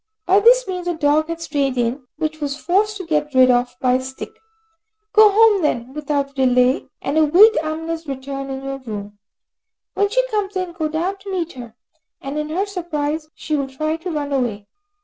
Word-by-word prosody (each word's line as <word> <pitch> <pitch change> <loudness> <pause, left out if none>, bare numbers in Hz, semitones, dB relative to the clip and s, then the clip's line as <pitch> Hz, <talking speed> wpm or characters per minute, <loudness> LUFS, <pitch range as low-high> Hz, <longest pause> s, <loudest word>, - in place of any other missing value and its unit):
By 380 +2 +5
this - - +5
means 365 -2 -4
a 350 - 0
dog 305 0 +2
had 335 0 -5
strayed 280 -5 -1
in, 245 +2 -1
which 310 0 -1
she 310 - -18
was 285 -2 -3
forced 410 +6 +1
to 375 - -7
get 300 -3 -1
rid 255 0 +6
of 245 0 +1
by 250 -1 +2
a 255 - +2
stick. 265 0 -7 0.8
Go 430 -1 +8
home 425 -1 +5
then 255 -4 -1
without 285 -2 -2
delay, 255 -1 +2 0.2
and 290 +3 +1
await 360 +9 +6
Amina's 325 +1 -4
return 275 0 -5
in 265 0 -5
your 270 0 -5
room. 205 -4 -8 0.7
When 405 0 +1
she - - +1
comes 410 -3 -2
in, 370 -2 -2
go 330 -2 -2
down 345 +6 -2
to 390 0 -8
meet 345 -3 -3
her, 235 -3 -10 0.4
and 275 +2 -4
in 300 0 -4
her 365 +6 -1
surprise, 315 -5 -3
she 310 - -3
will 280 -2 -1
try 310 +4 -2
to 330 +3 -6
run 290 -3 -3
away. 230 -6 -1
305 Hz, 200 wpm, -20 LUFS, 270-360 Hz, 0.8 s, Go